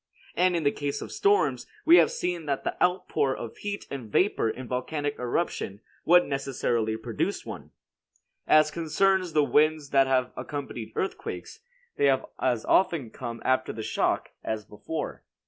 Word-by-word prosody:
And 180 0 +3
in 165 - 0
the 145 - +3
case 145 -1 -3
of - - -9
storms, 410 0 +2 0.2
we 335 +2 +8
have - - +6
seen 175 - -3
that 140 -1 -1
the - - -2
outpour 180 -6 +1
of 115 - -7
heat 205 0 -5
and 125 -6 -6
vapor 185 - +2
in 130 +3 -5
a - - -11
volcanic 145 +4 -2
eruption 120 - -2 0.3
would 175 +1 +6
necessarily 120 -5 -1
produce 110 - -3
one. - - -8 0.8
As 155 0 +5
concerns 175 +3 +1
the 150 - +4
winds 150 0 +2
that 135 -1 +5
have 130 -1 +1
accompanied 130 -6 -6
earthquakes, 195 - -4 0.4
they - - +3
have 135 -1 +3
as 120 -4 0
often 170 -11 +2
come 120 -3 -7
after 130 0 +2
the 110 - -6
shock - - 0
as 110 -2 -3
before. 150 +10 -6
145 Hz, 165 wpm, -27 LUFS, 125-175 Hz, 0.8 s, we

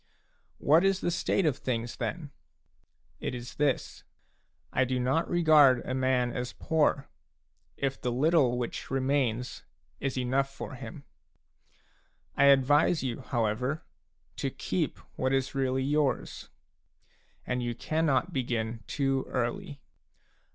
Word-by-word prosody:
What 160 +5 +4
is 195 -1 +3
the 175 - 0
state 175 +2 +1
of 150 -5 +2
things, 115 -3 -3
then? 160 -4 -4 0.9
It - - -3
is 120 0 -8
this: 145 -3 -1 0.7
I 130 - +3
do 130 0 -1
not 130 +7 +1
regard 155 -7 +5
a 130 - -3
man 130 -2 +1
as 125 0 -3
poor, 150 -3 +1 0.7
if 135 -1 -2
the 125 - -1
little 135 -1 +3
which 120 -1 -4
remains 130 -3 0 0.4
is 135 -1 -2
enough 135 +2 0
for 140 - -7
him. 130 +2 -9 1.3
I 140 - +4
advise 140 +4 +4
you, 125 -2 -2
however, 125 +4 -1 0.5
to - - -1
keep - - -2 0.2
what 130 +1 +1
is 135 -1 0
really 130 -1 0
yours; 145 0 -1 1.0
and 125 0 -1
you 120 -1 -2
cannot 160 +5 0
begin 115 -4 -2
too 135 -2 0
early. 125 +3 -3
130 Hz, 125 wpm, -29 LUFS, 125-145 Hz, 1.3 s, regard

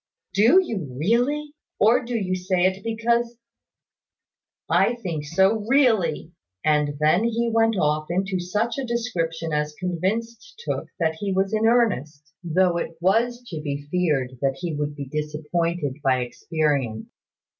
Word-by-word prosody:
"Do 230 - +6
you 185 - -4
really? 260 - +1 0.3
Or 235 +5 +4
do 240 0 -2
you 185 -3 -1
say 180 0 0
it 190 +1 0
because 235 +1 0 0.7
" - - -68 0.2
"I 240 - +1
think 170 -10 -4
so 190 +7 +2
really." 220 - +2 0.3
And 150 -1 +2
then 155 +7 +3
he 235 0 0
went 225 0 +3
off 155 -2 +1
into 190 +1 -1
such 210 +8 -1
a - - -2
description 170 -10 -2
as 150 0 -1
convinced 225 - -3
Tooke - - -2
that 160 -2 0
he 200 -1 -2
was 190 +2 0
in 220 +1 +2
earnest, 150 - 0
though 175 +1 +2
it 165 -1 -4
was 235 +7 +1
to 160 -4 -5
be 145 -1 -4
feared 140 -8 0
that 135 -1 +1
he 170 -3 -3
would 145 0 -3
be 140 -1 -5
disappointed 150 +1 -2
by 130 -2 +2
experience. 130 -2 -1
180 Hz, 150 wpm, -24 LUFS, 150-230 Hz, 0.7 s, Do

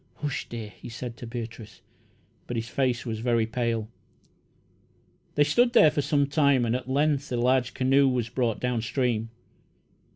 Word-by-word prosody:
"Hush, 145 -3 -4
dear!" 115 -3 -6
he - - -12
said 120 0 -6
to 120 - -8
Beatrice, 115 -3 -8 0.7
but 120 - -3
his 115 0 -3
face 125 -2 -1
was 110 -2 -3
very 115 -1 +1
pale. 115 -1 -2 1.5
They 145 - +5
stood 240 +12 +3
there 160 -10 +7
for 145 - 0
some 145 0 +2
time, 140 -3 +3
and 115 +1 0
at 125 0 -5
length 145 +1 +1
a 120 - 0
large 125 +1 +1
canoe 135 +1 +4
was 125 -3 -1
brought 120 -2 -1
down 125 -2 -1
stream. 115 -2 -1
125 Hz, 165 wpm, -26 LUFS, 115-140 Hz, 1.5 s, there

